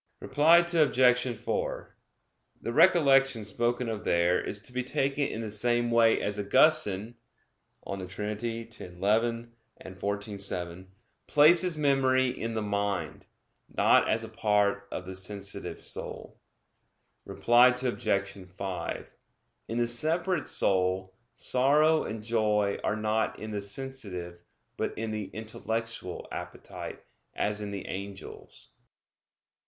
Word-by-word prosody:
Reply 160 Hz, +5 st, +4 dB
Obj. 125 Hz, -6 st, +3 dB
4: -, -, -4 dB, 0.6 s
The 115 Hz, -, -4 dB
recollection 135 Hz, -, +4 dB
spoken 120 Hz, +3 st, -1 dB
of 110 Hz, -2 st, -4 dB
there 85 Hz, +1 st, +2 dB
is 105 Hz, -, -4 dB
to 125 Hz, -, -10 dB
be 125 Hz, 0 st, -1 dB
taken 135 Hz, +2 st, 0 dB
in 110 Hz, -, -5 dB
the 110 Hz, -2 st, -5 dB
same 120 Hz, +2 st, +1 dB
way 115 Hz, -1 st, +4 dB
as 105 Hz, 0 st, -2 dB
Augustine 110 Hz, -2 st, +3 dB, 0.7 s
(De 95 Hz, -2 st, -5 dB
Trin. 105 Hz, +3 st, -4 dB, 0.3 s
x, 115 Hz, 0 st, -12 dB
11; 115 Hz, +6 st, -1 dB, 0.3 s
xiv, 100 Hz, +2 st, -4 dB
7) 90 Hz, -1 st, -4 dB, 0.4 s
places 165 Hz, +3 st, +5 dB
memory 130 Hz, -3 st, +3 dB
in 115 Hz, -2 st, -4 dB
the 110 Hz, -, -1 dB
mind; 100 Hz, -2 st, -3 dB, 0.4 s
not -, -, +4 dB
as -, -, +1 dB
a -, -, -7 dB
part 100 Hz, -1 st, +1 dB
of 90 Hz, -, -5 dB
the 95 Hz, -, -7 dB
sensitive 100 Hz, +1 st, -4 dB
soul. -, -, -5 dB, 0.8 s
Reply 120 Hz, +1 st, +4 dB
Obj. 120 Hz, -6 st, -1 dB
5: 95 Hz, 0 st, -5 dB, 0.6 s
In 115 Hz, -, -4 dB
the 120 Hz, -, +2 dB
separate 160 Hz, +7 st, 0 dB
soul, 95 Hz, 0 st, +1 dB, 0.2 s
sorrow 150 Hz, +5 st, +3 dB
and 110 Hz, 0 st, -6 dB
joy 105 Hz, -3 st, +1 dB
are 105 Hz, -, 0 dB
not 110 Hz, +1 st, -1 dB
in 110 Hz, 0 st, -7 dB
the 105 Hz, -1 st, -3 dB
sensitive, 100 Hz, -6 st, -6 dB, 0.4 s
but -, -, -3 dB
in 110 Hz, 0 st, -3 dB
the 105 Hz, -1 st, -3 dB
intellectual 110 Hz, -1 st, -5 dB
appetite, -, -, -8 dB, 0.3 s
as 105 Hz, +1 st, -1 dB
in 105 Hz, -, -4 dB
the 100 Hz, -1 st, -6 dB
angels. 100 Hz, +1 st, -8 dB
110 Hz, 125 wpm, -28 LUFS, 100-125 Hz, 0.8 s, places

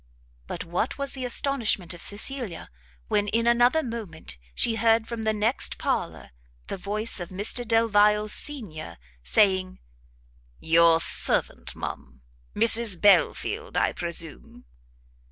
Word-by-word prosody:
But -, -, -6 dB
what 175 Hz, +8 st, -3 dB
was 280 Hz, -1 st, -2 dB
the 260 Hz, -2 st, -6 dB
astonishment 235 Hz, -9 st, 0 dB
of 175 Hz, -, -12 dB
Cecilia, 215 Hz, -3 st, -3 dB, 0.4 s
when, 205 Hz, 0 st, 0 dB
in 230 Hz, +2 st, 0 dB
another 245 Hz, +6 st, +3 dB
moment, 200 Hz, -, -8 dB, 0.2 s
she 225 Hz, -1 st, +2 dB
heard 225 Hz, 0 st, +2 dB
from 235 Hz, -1 st, -5 dB
the 220 Hz, 0 st, 0 dB
next 215 Hz, +4 st, -1 dB
parlour -, -, -3 dB, 0.3 s
the -, -, -6 dB
voice 210 Hz, +4 st, -3 dB
of 175 Hz, -, -7 dB
Mr 205 Hz, +6 st, -2 dB
Delvile 210 Hz, -2 st, +3 dB
senior, 205 Hz, -, -6 dB, 0.3 s
saying, 185 Hz, -, +1 dB, 0.8 s
"Your 165 Hz, 0 st, +4 dB
servant, -, -, +2 dB
ma'am; 65 Hz, 0 st, -8 dB, 0.3 s
Mrs 225 Hz, -3 st, +5 dB
Belfield, 425 Hz, -, +1 dB
I -, -, +1 dB
presume?" 165 Hz, -, -6 dB
215 Hz, 120 wpm, -25 LUFS, 180-235 Hz, 0.8 s, Mrs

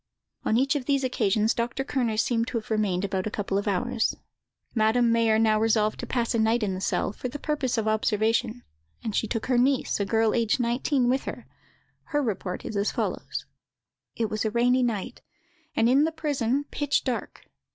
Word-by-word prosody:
On 220 Hz, -, +2 dB
each 275 Hz, +3 st, +2 dB
of 275 Hz, -4 st, -2 dB
these 275 Hz, -1 st, +1 dB
occasions 220 Hz, -3 st, +1 dB
Dr. 240 Hz, +3 st, -2 dB
Kerner 245 Hz, -6 st, -1 dB
seems 230 Hz, 0 st, +1 dB
to 250 Hz, -, -2 dB
have 220 Hz, 0 st, -6 dB
remained 200 Hz, -3 st, +1 dB
about 190 Hz, 0 st, -2 dB
a -, -, -1 dB
couple 200 Hz, -1 st, -1 dB
of 205 Hz, -, -5 dB
hours. 225 Hz, +4 st, 0 dB, 0.6 s
Madame 230 Hz, +1 st, +3 dB
Mayer 230 Hz, -1 st, +3 dB
now 220 Hz, -1 st, +3 dB
resolved 215 Hz, -1 st, +2 dB
to -, -, -5 dB
pass 240 Hz, -2 st, 0 dB
a 230 Hz, -, +1 dB
night 220 Hz, +1 st, +2 dB
in 195 Hz, -2 st, 0 dB
the 185 Hz, -, -5 dB
cell, 195 Hz, -, 0 dB
for 250 Hz, -, -5 dB
the 260 Hz, +4 st, -6 dB
purpose 285 Hz, -5 st, -1 dB
of 220 Hz, -1 st, 0 dB
observation; 220 Hz, +2 st, +1 dB, 0.4 s
and 220 Hz, -3 st, -3 dB
she 220 Hz, -, +1 dB
took 225 Hz, 0 st, -2 dB
her 250 Hz, -2 st, +2 dB
niece, 265 Hz, -2 st, +1 dB
a 200 Hz, -, +1 dB
girl 220 Hz, +1 st, +2 dB
aged 230 Hz, +1 st, +1 dB
nineteen, 245 Hz, +2 st, +1 dB
with 260 Hz, +2 st, +1 dB
her: -, -, -6 dB, 0.6 s
her 295 Hz, -2 st, 0 dB
report 195 Hz, -5 st, -3 dB
is 220 Hz, -, -5 dB
as 200 Hz, +1 st, +1 dB
follows:— -, -, -3 dB, 0.7 s
"It 225 Hz, -, 0 dB
was 215 Hz, 0 st, -2 dB
a 220 Hz, -, +1 dB
rainy 245 Hz, +3 st, +3 dB
night, 230 Hz, -6 st, -2 dB, 0.5 s
and, 225 Hz, -, +3 dB
in 270 Hz, +5 st, +5 dB
the 325 Hz, -, 0 dB
prison, 285 Hz, -4 st, -1 dB
pitch 290 Hz, -1 st, 0 dB
dark. 255 Hz, -3 st, -4 dB
230 Hz, 200 wpm, -26 LUFS, 215-255 Hz, 0.7 s, in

